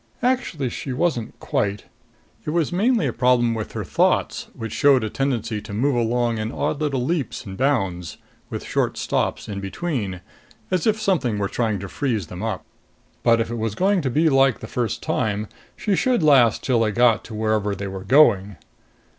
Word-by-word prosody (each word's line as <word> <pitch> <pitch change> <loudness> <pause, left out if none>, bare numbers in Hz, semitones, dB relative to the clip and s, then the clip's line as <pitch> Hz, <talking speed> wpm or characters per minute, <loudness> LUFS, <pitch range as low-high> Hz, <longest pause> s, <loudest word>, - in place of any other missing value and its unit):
Actually 245 - 0
she 135 - -5
wasn't 125 -4 -1
quite. 100 0 -1 0.6
It - - -4
was 165 0 0
mainly 220 - +2
a 125 - -1
problem 125 -1 +3
with 110 -2 -5
her - - -3
thoughts, - - +1
which 115 -1 -6
showed 140 -4 +4
a 110 - -3
tendency 120 -6 -1
to 105 - -9
move 135 +6 +1
along 120 -1 0
in 110 +1 -3
odd 145 - -2
little 135 -5 0
leaps 150 -7 -2
and 95 -2 -7
bounds, 95 - -1 0.3
with - - -5
short - - -1
stops - - -1
in 100 -2 -4
between, 100 - -3 0.5
as 185 +3 +1
if 220 0 +2
something 175 - +1
were 100 -1 0
trying 110 -1 -1
to 100 +1 -6
freeze 115 - -2
them 90 +3 -8
up. 110 -4 -3 0.6
But 115 0 +4
if 115 0 -1
it 120 - -3
was 110 -2 -2
going 195 0 +2
to 135 - -1
be 155 +6 +2
like 135 -4 +4
the - - -7
first 115 -1 -3
time, 105 0 -1 0.3
she 205 - 0
should 245 +1 +1
last 130 -7 +5
till 125 -3 +2
they 110 -2 +2
got 115 -1 +3
to 110 - -8
wherever 110 -2 0
they 100 +1 -5
were 95 -1 -6
going. 105 -5 +4
120 Hz, 190 wpm, -22 LUFS, 105-145 Hz, 0.6 s, last